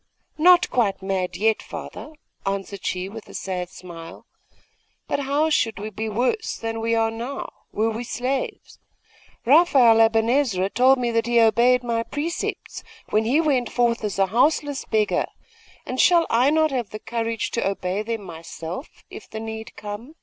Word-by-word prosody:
'Not 355 Hz, +3 st, +6 dB
quite 205 Hz, -6 st, +1 dB
mad 185 Hz, -2 st, -2 dB
yet, 220 Hz, +2 st, +2 dB
father,' 310 Hz, -, -8 dB, 0.3 s
answered 195 Hz, 0 st, -4 dB
she 185 Hz, 0 st, -2 dB
with 215 Hz, +2 st, -10 dB
a -, -, -11 dB
sad 180 Hz, -2 st, -4 dB
smile. 170 Hz, -3 st, -11 dB, 0.8 s
'But -, -, -1 dB
how 285 Hz, +3 st, +1 dB
should 230 Hz, -7 st, +1 dB
we 215 Hz, +1 st, -6 dB
be 220 Hz, +2 st, -4 dB
worse 250 Hz, -, -1 dB
than 225 Hz, 0 st, -4 dB
we 230 Hz, 0 st, +1 dB
are 225 Hz, 0 st, +2 dB
now, 240 Hz, +5 st, -5 dB, 0.2 s
were 220 Hz, +1 st, 0 dB
we 225 Hz, +2 st, -4 dB
slaves? 255 Hz, +3 st, -4 dB, 0.7 s
Raphael 260 Hz, -6 st, +6 dB
Aben 225 Hz, 0 st, +3 dB
Ezra 230 Hz, -8 st, +1 dB
told 260 Hz, +2 st, +5 dB
me 240 Hz, -2 st, -1 dB
that 230 Hz, 0 st, 0 dB
he 240 Hz, 0 st, +3 dB
obeyed 240 Hz, +3 st, +4 dB
my 230 Hz, -1 st, 0 dB
precepts, 295 Hz, +8 st, -4 dB, 0.3 s
when 215 Hz, +1 st, +2 dB
he 265 Hz, +7 st, +3 dB
went 275 Hz, -7 st, +1 dB
forth 235 Hz, -2 st, +1 dB
as 205 Hz, -3 st, -2 dB
a 195 Hz, -, +4 dB
houseless 280 Hz, +6 st, +1 dB
beggar; 215 Hz, -1 st, +1 dB, 0.6 s
and 255 Hz, -, 0 dB
shall 345 Hz, -2 st, +5 dB
I 245 Hz, +4 st, +4 dB
not 315 Hz, 0 st, +3 dB
have 245 Hz, -5 st, -2 dB, 0.2 s
courage 230 Hz, -1 st, -2 dB
to 235 Hz, -, 0 dB
obey 195 Hz, 0 st, -2 dB
them 225 Hz, -1 st, -4 dB
myself, 170 Hz, -, -8 dB
if -, -, -10 dB
the 220 Hz, -, -6 dB
need 220 Hz, 0 st, -7 dB
come? 210 Hz, +8 st, -8 dB
230 Hz, 165 wpm, -23 LUFS, 205-255 Hz, 0.8 s, Not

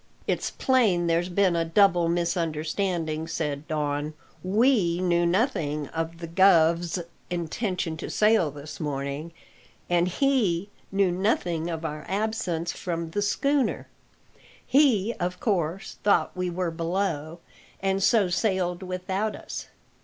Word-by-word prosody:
"It's -, -, -1 dB
plain 220 Hz, -10 st, +2 dB
there's 170 Hz, +1 st, +1 dB
been 185 Hz, -1 st, +2 dB
a 165 Hz, -, +2 dB
double 175 Hz, 0 st, +3 dB
misunderstanding," 165 Hz, -1 st, -1 dB
said 150 Hz, -2 st, -3 dB
Don; 150 Hz, -1 st, -2 dB, 0.3 s
"we 200 Hz, -3 st, +3 dB
knew 175 Hz, -1 st, +2 dB
nothing 165 Hz, -, 0 dB
of 165 Hz, 0 st, -4 dB
the 170 Hz, 0 st, -7 dB
guv's 170 Hz, -1 st, +4 dB, 0.3 s
intention 175 Hz, -1 st, -2 dB
to -, -, -6 dB
sail 210 Hz, -6 st, +3 dB
this 145 Hz, +2 st, -9 dB
morning, 145 Hz, +1 st, -3 dB, 0.6 s
and 175 Hz, 0 st, +3 dB
he 205 Hz, -5 st, +1 dB, 0.2 s
knew 195 Hz, -2 st, +2 dB
nothing 175 Hz, -3 st, 0 dB
of 165 Hz, -1 st, -4 dB
our 150 Hz, -1 st, -4 dB
absence 195 Hz, -4 st, -1 dB
from 170 Hz, -2 st, -4 dB
the 205 Hz, -, -1 dB
schooner. 275 Hz, +6 st, +1 dB, 0.8 s
He, 240 Hz, -6 st, +3 dB
of 180 Hz, +1 st, -2 dB
course, 185 Hz, -4 st, -2 dB
thought 205 Hz, -, +2 dB
we 180 Hz, 0 st, -1 dB
were 175 Hz, -1 st, -2 dB
below, 165 Hz, -2 st, -2 dB, 0.4 s
and 195 Hz, 0 st, 0 dB
so 205 Hz, -1 st, +4 dB
sailed 180 Hz, -1 st, 0 dB
without 190 Hz, +3 st, -2 dB
us. -, -, -7 dB
175 Hz, 125 wpm, -26 LUFS, 165-195 Hz, 0.8 s, guv's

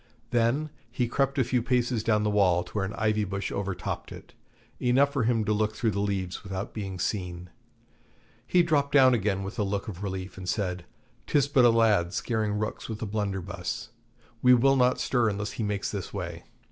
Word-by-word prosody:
Then 120 Hz, +6 st, +1 dB, 0.2 s
he 125 Hz, -, -1 dB
crept 135 Hz, +3 st, 0 dB
a 130 Hz, -, +4 dB
few 125 Hz, +1 st, 0 dB
paces 125 Hz, -2 st, 0 dB
down 105 Hz, -2 st, +2 dB
the 105 Hz, -, +1 dB
wall 90 Hz, -4 st, +3 dB
to 90 Hz, -, -14 dB
where 105 Hz, -3 st, -1 dB
an 100 Hz, -, -5 dB
ivy 110 Hz, -1 st, +1 dB
bush 100 Hz, 0 st, -3 dB
over 100 Hz, -2 st, -2 dB
topped 90 Hz, -, -5 dB
it, -, -, -11 dB, 0.5 s
enough 135 Hz, +3 st, +3 dB
for 135 Hz, -6 st, +1 dB
him 115 Hz, -2 st, +1 dB
to 105 Hz, -, +1 dB
look 110 Hz, 0 st, 0 dB
through 110 Hz, 0 st, 0 dB
the 100 Hz, -, -2 dB
leaves 95 Hz, -3 st, -2 dB
without 95 Hz, 0 st, -5 dB
being 95 Hz, -3 st, -5 dB
seen. 90 Hz, -2 st, -3 dB, 1.0 s
He 180 Hz, -1 st, +4 dB
dropped 145 Hz, -4 st, +1 dB
down 130 Hz, -3 st, +7 dB
again 100 Hz, -3 st, 0 dB
with 100 Hz, +3 st, -6 dB
a -, -, +2 dB
look 100 Hz, +1 st, -2 dB
of 95 Hz, -4 st, -7 dB
relief, 95 Hz, -2 st, -5 dB
and 90 Hz, -1 st, -5 dB
said, 90 Hz, -4 st, -2 dB, 0.4 s
''Tis 140 Hz, -2 st, +3 dB
but 135 Hz, -3 st, +4 dB
a -, -, +8 dB
lad 110 Hz, -6 st, +3 dB
scaring 110 Hz, -3 st, -1 dB
rooks 105 Hz, +2 st, -3 dB
with 110 Hz, -1 st, -4 dB
a -, -, -1 dB
blunderbuss; 100 Hz, 0 st, -3 dB, 0.5 s
we 125 Hz, 0 st, +7 dB
will 135 Hz, +3 st, +4 dB
not 125 Hz, -1 st, +3 dB
stir 120 Hz, -4 st, +2 dB
unless 105 Hz, 0 st, -3 dB
he 115 Hz, -, -4 dB
makes 105 Hz, -1 st, -2 dB
this 100 Hz, -3 st, -5 dB
way.' 85 Hz, -4 st, -6 dB
105 Hz, 205 wpm, -27 LUFS, 95-120 Hz, 1.0 s, a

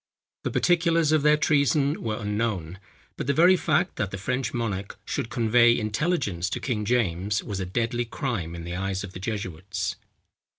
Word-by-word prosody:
The -, -, -1 dB
particulars 165 Hz, -3 st, +2 dB
of 155 Hz, -1 st, +4 dB
their 150 Hz, +1 st, +5 dB
treason 145 Hz, -1 st, +2 dB
were 110 Hz, -1 st, -2 dB
unknown; 105 Hz, -5 st, -2 dB, 0.4 s
but -, -, -4 dB
the 140 Hz, -, +2 dB
very 175 Hz, +4 st, +6 dB
fact 180 Hz, 0 st, +1 dB
that 100 Hz, -, -1 dB
the 100 Hz, -, -5 dB
French 125 Hz, +4 st, -2 dB
monarch 100 Hz, -4 st, -3 dB
should 135 Hz, -5 st, -3 dB
convey 120 Hz, -2 st, +4 dB
intelligence 105 Hz, -, -1 dB
to -, -, -3 dB
King 110 Hz, -5 st, -2 dB
James, 100 Hz, -4 st, 0 dB
was 100 Hz, -2 st, -4 dB
a 95 Hz, -, -3 dB
deadly 120 Hz, +4 st, -1 dB
crime 115 Hz, -, -3 dB
in 85 Hz, -, -7 dB
the 85 Hz, +1 st, -5 dB
eyes 95 Hz, +1 st, -2 dB
of 95 Hz, -2 st, -8 dB
the 90 Hz, -, -7 dB
jesuits. 95 Hz, -3 st, -4 dB
115 Hz, 175 wpm, -26 LUFS, 95-140 Hz, 0.4 s, very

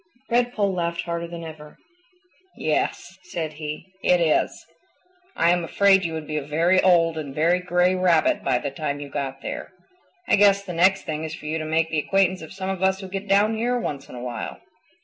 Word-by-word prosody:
Redpoll 235 Hz, -5 st, +1 dB
laughed 170 Hz, -1 st, -1 dB
harder 170 Hz, 0 st, -4 dB
than 170 Hz, 0 st, -8 dB
ever. 150 Hz, -2 st, -10 dB, 0.8 s
"Yes," 175 Hz, +4 st, -2 dB
said 170 Hz, -4 st, -5 dB
he, 150 Hz, +4 st, -7 dB
"it 180 Hz, -2 st, +3 dB
is. 160 Hz, -3 st, +1 dB, 0.7 s
I 170 Hz, -, +4 dB
am 175 Hz, -1 st, +1 dB
afraid 195 Hz, +3 st, +4 dB
you 165 Hz, -2 st, -2 dB
would 160 Hz, -1 st, -5 dB
be 155 Hz, 0 st, -3 dB
a -, -, -1 dB
very 165 Hz, +6 st, +2 dB
old 165 Hz, -3 st, +3 dB
and 140 Hz, -3 st, -7 dB
very 170 Hz, +4 st, +3 dB
gray 180 Hz, 0 st, +2 dB
Rabbit 180 Hz, -3 st, +2 dB
by 125 Hz, -, +2 dB
the 140 Hz, +2 st, -4 dB
time 145 Hz, 0 st, -3 dB
you 145 Hz, -1 st, -7 dB
got 135 Hz, -1 st, -4 dB
there. -, -, -6 dB, 0.5 s
I -, -, +4 dB
guess 200 Hz, -1 st, +5 dB
the 180 Hz, -, -6 dB
next 190 Hz, +3 st, +3 dB
thing 155 Hz, -1 st, -4 dB
is 160 Hz, 0 st, -5 dB
for 150 Hz, -, -13 dB
you 155 Hz, +2 st, -2 dB
to 155 Hz, -, -4 dB
make 160 Hz, +1 st, 0 dB
the 155 Hz, -, +1 dB
acquaintance 185 Hz, +2 st, +1 dB
of 160 Hz, -, -9 dB
some 190 Hz, 0 st, -4 dB
of 190 Hz, -1 st, -5 dB
us 190 Hz, 0 st, +2 dB
who 190 Hz, -1 st, -8 dB
get 195 Hz, +2 st, -5 dB
down 205 Hz, +3 st, +3 dB
here 240 Hz, +3 st, 0 dB
once 140 Hz, -, -5 dB
in -, -, -10 dB
awhile." 120 Hz, -1 st, -5 dB
170 Hz, 210 wpm, -24 LUFS, 155-190 Hz, 0.8 s, guess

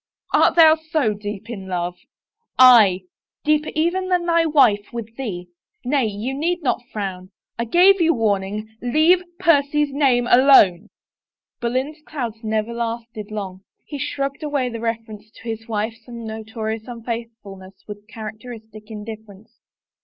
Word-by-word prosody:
Art -, -, +4 dB
thou 320 Hz, -2 st, +8 dB
so 315 Hz, -8 st, -1 dB
deep 205 Hz, +1 st, -7 dB
in 200 Hz, -5 st, -7 dB
love? 175 Hz, -1 st, -3 dB, 0.4 s
" 465 Hz, -, -54 dB
Aye 225 Hz, -8 st, +7 dB, 0.2 s
— -, -, -71 dB
deeper 305 Hz, 0 st, +2 dB
even 345 Hz, +4 st, 0 dB
than 360 Hz, -1 st, +1 dB
thy 335 Hz, -1 st, +2 dB
wife 240 Hz, -10 st, +3 dB
with 230 Hz, -1 st, -7 dB
thee!... 185 Hz, -9 st, -6 dB, 0.4 s
Nay, 270 Hz, -1 st, +1 dB
you 215 Hz, +5 st, -4 dB
need 340 Hz, +5 st, -2 dB
not 255 Hz, -, 0 dB
frown. 185 Hz, -3 st, -5 dB, 0.3 s
I 235 Hz, -, 0 dB
gave 360 Hz, -, +5 dB
you 330 Hz, 0 st, +4 dB
warning 215 Hz, 0 st, -2 dB
— -, -, -40 dB
leave 310 Hz, +9 st, +3 dB, 0.2 s
Percy's 295 Hz, -4 st, +2 dB
name 265 Hz, -4 st, +2 dB
alone." 245 Hz, -9 st, +5 dB, 0.7 s
Boleyn's 260 Hz, +6 st, -2 dB
clouds 245 Hz, -8 st, -5 dB
never 220 Hz, +1 st, -2 dB
lasted 230 Hz, -2 st, -5 dB
long; 195 Hz, -3 st, -6 dB, 0.2 s
he 290 Hz, -, -7 dB
shrugged 275 Hz, 0 st, -3 dB
away 290 Hz, -4 st, -1 dB
the 230 Hz, -1 st, -6 dB
reference 225 Hz, -2 st, -5 dB
to 215 Hz, -, -18 dB
his 225 Hz, -1 st, -6 dB
wife's 225 Hz, +1 st, -4 dB
notorious 220 Hz, -1 st, -6 dB
unfaithfulness 230 Hz, -5 st, -8 dB
with 205 Hz, 0 st, -10 dB
characteristic 220 Hz, 0 st, -10 dB
indifference. 220 Hz, 0 st, -10 dB
230 Hz, 145 wpm, -21 LUFS, 215-280 Hz, 0.7 s, thou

